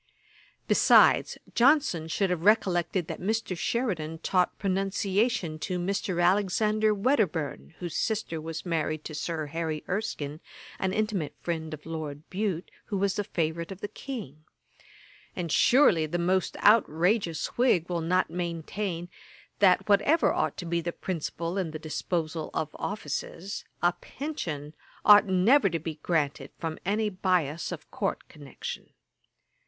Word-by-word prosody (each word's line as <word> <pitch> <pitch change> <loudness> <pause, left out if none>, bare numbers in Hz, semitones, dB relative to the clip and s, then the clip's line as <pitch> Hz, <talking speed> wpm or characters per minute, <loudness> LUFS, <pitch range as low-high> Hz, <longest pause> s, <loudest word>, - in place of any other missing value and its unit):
Besides, - - +5 0.2
Johnson 245 - +3
should 190 +3 0
have 170 -2 -1
recollected 185 -4 +2
that - - -6
Mr. 215 -1 -1
Sheridan 170 -6 -1
taught 180 -1 +1
pronunciation 195 -1 0
to 180 +2 -2
Mr. 185 0 -1
Alexander 210 +3 +2
Wedderburne, 190 - 0
whose 175 -3 -5
sister 210 -7 -1
was 160 +1 -6
married 155 -2 -1
to 155 - -7
Sir 155 0 -3
Harry 160 0 -3
Erskine, 155 -7 -3 0.4
an 190 - 0
intimate 200 -8 -1
friend 160 -2 -3
of 155 -1 -8
Lord 155 -2 -6
Bute, 190 -3 -2
who 200 - -3
was 195 0 +1
the 205 - -1
favourite 170 -1 -2
of 190 - -7
the - - -2
King; 205 - -8 0.9
and 170 -3 -3
surely 205 - +5
the 175 +3 -2
most 180 +2 0
outrageous 185 -3 +3
Whig 235 -9 +3
will 175 -2 -2
not 180 +3 +1
maintain, 175 +1 -3 0.5
that, 185 -3 +4
whatever 215 +11 +4
ought - - -1
to 180 - -5
be 170 0 0
the 170 +1 -3
principle 170 +1 -3
in 180 -4 -1
the 155 - -5
disposal 160 0 -3
of 155 - -1
offices, 195 0 -4 0.2
a 175 0 +4
pension 160 - -5 0.3
ought 205 0 +8
never 195 +6 +4
to 165 - -1
be 160 -1 -6
granted 145 -5 -1
from 160 -1 -4
any 215 +2 +1
bias 180 -5 0
of - - -8
court - - -2
connection. 145 -3 -8
175 Hz, 140 wpm, -28 LUFS, 160-200 Hz, 0.9 s, ought